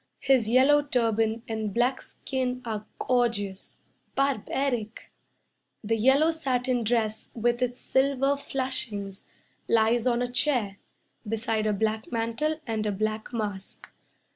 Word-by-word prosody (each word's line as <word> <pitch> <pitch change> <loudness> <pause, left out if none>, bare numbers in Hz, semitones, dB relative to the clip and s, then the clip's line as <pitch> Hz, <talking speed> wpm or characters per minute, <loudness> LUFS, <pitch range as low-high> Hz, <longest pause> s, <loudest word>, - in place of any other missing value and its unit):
His 260 -5 +3
yellow 270 +5 +5
turban 225 -4 0
and 220 -2 -2
black 250 +2 +2
skin 255 -1 -4
Are 215 -2 -4
gorgeous 225 -6 -1 0.3
barbaric. 265 -3 -1 0.7
The 225 +2 +1
yellow 265 +8 +4
satin 255 -5 0
dress 220 -1 0
with 240 +1 +1
its 245 0 -1
silver 275 +1 +2
flashings 255 -8 -3 0.4
Lies 230 +2 +3
on 240 0 +2
a 245 - -3
chair 245 -7 0 0.5
Beside 220 0 0
a 210 - +2
black 220 +2 -1
mantle 230 +7 -1
and 220 -3 -2
a - - +1
black 215 +3 -2
mask. 205 -5 -5
235 Hz, 120 wpm, -27 LUFS, 220-260 Hz, 0.7 s, yellow